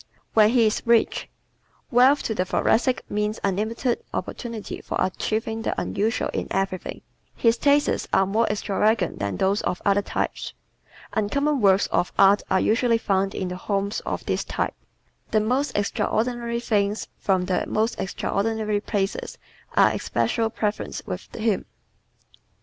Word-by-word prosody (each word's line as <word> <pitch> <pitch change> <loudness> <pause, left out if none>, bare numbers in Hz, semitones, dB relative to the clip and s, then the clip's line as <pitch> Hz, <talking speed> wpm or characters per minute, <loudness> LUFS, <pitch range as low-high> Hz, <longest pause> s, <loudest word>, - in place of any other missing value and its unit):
When 215 -1 +6
He 235 -1 +4
is 215 - +1
Rich 235 -1 +2 0.6
¶ - - -36
Wealth 260 +4 +5
to 220 - -1
the 185 - 0
Thoracic 240 +6 +1
means 210 +1 -1
unlimited 220 +5 -1
opportunity 230 -4 -5
for - - -4
achieving 220 +4 -1
the - - -2
unusual 220 +3 -1
in - - -3
everything. 190 -1 -3 0.3
His 230 -1 +3
tastes 285 +3 +2
are 195 - +4
more 220 +4 +1
extravagant 210 -1 0
than 100 -2 -2
those 195 +2 +1
of 180 - -2
other 200 0 +4
types. - - -3 0.6
Uncommon 280 +6 +1
works 195 -1 +5
of 175 - +1
art 200 +1 +6
are 190 - +3
usually 230 +3 +3
found 195 -3 0
in 185 - -2
the 180 - -4
homes 200 +2 -1
of - - -4
this - - -1
type. - - -2 0.6
The 215 - +3
most 250 +6 0
extraordinary 235 +3 -1
things 210 -2 0
from 190 -2 +1
the 180 -1 0
most 220 +2 0
extraordinary 215 +2 -1
places 200 -1 -2 0.4
are - - +6
especial 225 -2 0
preferences 210 -1 -3
with - - -6
him. 220 -3 0
215 Hz, 145 wpm, -24 LUFS, 195-230 Hz, 0.6 s, When